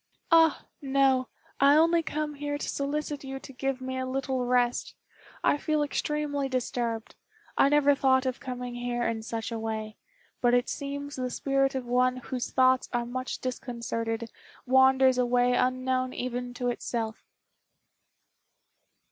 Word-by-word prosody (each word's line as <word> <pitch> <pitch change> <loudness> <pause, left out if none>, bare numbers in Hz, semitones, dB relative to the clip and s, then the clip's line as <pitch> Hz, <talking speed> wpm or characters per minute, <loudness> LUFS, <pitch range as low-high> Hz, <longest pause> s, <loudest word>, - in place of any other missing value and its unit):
"Ah! 325 -2 +5 0.2
no. 270 -2 +2 0.3
I 280 +1 +6
only 330 +2 +4
come 305 -1 -3
here 290 0 -3
to - - -5
solicit 290 +1 -2
you 270 0 -5
to 270 - -12
give 270 0 -2
me 260 0 -4
a 260 - -2
little 260 -1 -1
rest. 245 -1 +1 0.5
I - - +3
feel 305 0 0
extremely 290 -1 -1
disturbed. 235 -3 -2 0.4
I 275 - +5
never 290 -1 +5
thought 265 -1 +3
of 255 -1 -2
coming 250 -2 -5
here 240 0 -2
in 230 -1 -1
such 225 +1 -4
a 230 - -3
way; 220 -1 -4 0.4
but 245 0 +4
it 245 - +1
seems 285 0 -5
the 255 -1 -2
spirit 275 +2 0
of 260 -2 -3
one 250 +1 +2
whose 255 0 -4
thoughts 260 0 +3
are 240 -1 -1
much 255 +2 -4
disconcerted 230 -2 -3 0.3
wanders 265 0 +5
away 245 0 +3
unknown 255 0 0
even 245 0 -4
to 245 0 -1
itself. 230 -2 -3
255 Hz, 150 wpm, -28 LUFS, 245-275 Hz, 0.5 s, I